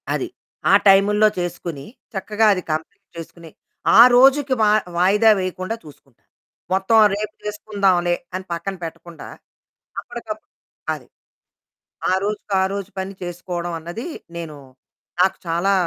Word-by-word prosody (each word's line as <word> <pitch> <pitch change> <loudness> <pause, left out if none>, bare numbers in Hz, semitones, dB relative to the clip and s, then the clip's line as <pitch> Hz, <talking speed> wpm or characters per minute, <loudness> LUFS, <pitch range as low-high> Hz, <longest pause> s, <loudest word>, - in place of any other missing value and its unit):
అది. - - -2 0.4
ఆ - - +6
టైములో 205 +2 +5
చేసుకొని 170 -4 -5 0.3
చక్కగా 210 +2 0
అది 185 - -3
కంప్లీట్ 155 +1 -5
చేసుకొని, 165 0 -10 0.5
ఆ - - +9 0.2
రోజుకి 270 +2 +5
మా 210 - +5 0.3
వాయిదా 205 +5 +4
వేయకుండా 185 +3 -3
చూసుకుంటాను. 140 -4 -18 0.4
మొత్తం 190 +4 +3 0.2
రేపు 210 +1 -4
చేసుకుందాంలే 200 -4 +1 0.2
అని 185 0 -5
పక్కన 170 +3 -4
పెట్టకుండా, 165 0 -9 0.7
అప్పటికప్పుడు 215 -2 -8 0.4
అది - - -14 1.0
ఆ - - +2
రోజుకి 210 0 -4
ఆ - - +3
రోజు 200 -1 -5
పని 190 +1 -4
చేసుకోవడమన్నది 175 +2 -5 0.3
నేను 165 -3 -6 0.6
నాకు 190 +1 +3
చాలా 170 +4 +1
190 Hz, 115 wpm, -21 LUFS, 170-210 Hz, 1.0 s, ఆ